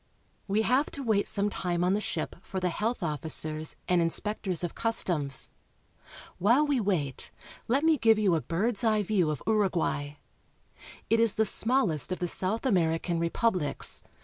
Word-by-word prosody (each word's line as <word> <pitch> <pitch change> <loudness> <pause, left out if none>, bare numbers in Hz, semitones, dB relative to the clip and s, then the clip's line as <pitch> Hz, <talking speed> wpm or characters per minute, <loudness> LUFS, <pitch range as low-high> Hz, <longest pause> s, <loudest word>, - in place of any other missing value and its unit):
We 210 +2 +1
have 260 +6 +2
to 280 - -5
wait 215 -4 +1
some 205 0 +1
time 175 -2 -2
on 180 +1 +2
the 210 - 0
ship 165 -6 -3
for 190 - -5
the 180 -1 0
health 220 +3 -2
officers 155 0 -2
and 180 -1 +3
inspectors 185 +1 -1
of 175 - -3
customs. 170 - 0 0.9
While 240 +11 +4
we 285 -3 +1
wait, 170 - -2 0.4
let 270 +5 +1
me 320 -3 +3
give 225 -1 +4
you 205 -4 +2
a 160 - +1
bird's 205 +8 -1
eye 215 -2 +2
view 185 -5 +1
of 150 - -4
Uruguay. 175 -9 0 1.0
It 225 - +4
is 230 -2 +4
the 220 - +2
smallest 205 - 0
of 185 - -1
the 180 - -2
South 195 +8 -2
American 170 -5 +1
republics. 170 -1 0
195 Hz, 165 wpm, -28 LUFS, 165-225 Hz, 1.0 s, While